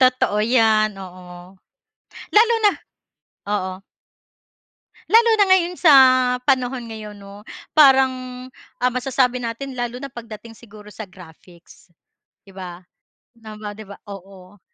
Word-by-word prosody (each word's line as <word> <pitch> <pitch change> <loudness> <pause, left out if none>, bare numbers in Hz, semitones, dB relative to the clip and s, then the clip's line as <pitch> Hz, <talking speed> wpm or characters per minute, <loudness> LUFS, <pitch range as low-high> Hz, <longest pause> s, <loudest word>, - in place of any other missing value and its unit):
Totoo 255 -5 +2
'yan, 220 -2 +2
oo. 180 -1 -12 0.8
Lalo 455 +2 +5
na 410 - +6 0.8
oo. 185 -2 -3 1.3
Lalo 460 +1 +5
na 410 - +4
ngayon, 360 -1 +2
sa 325 -5 +5 0.6
panahon 255 -2 0
ngayon 215 -2 -9
'no? 200 +1 -13 0.3
Parang, 265 -3 +6 0.7
ah, 250 - +2
masasabi 255 0 0
natin 250 +3 -6
lalo 245 +1 -4
na 275 - -7
pagdating 230 -1 -11
siguro 210 -2 -15
sa 215 +1 -9
graphics. 175 -1 -18 0.5
'Di 195 - -17
ba? 180 -1 -10 0.6
'No 220 -1 -11
ba 210 -1 -7
'di 215 +1 -11
ba? 200 - -10 0.2
Oo, 195 0 -13
220 Hz, 120 wpm, -20 LUFS, 195-255 Hz, 1.3 s, na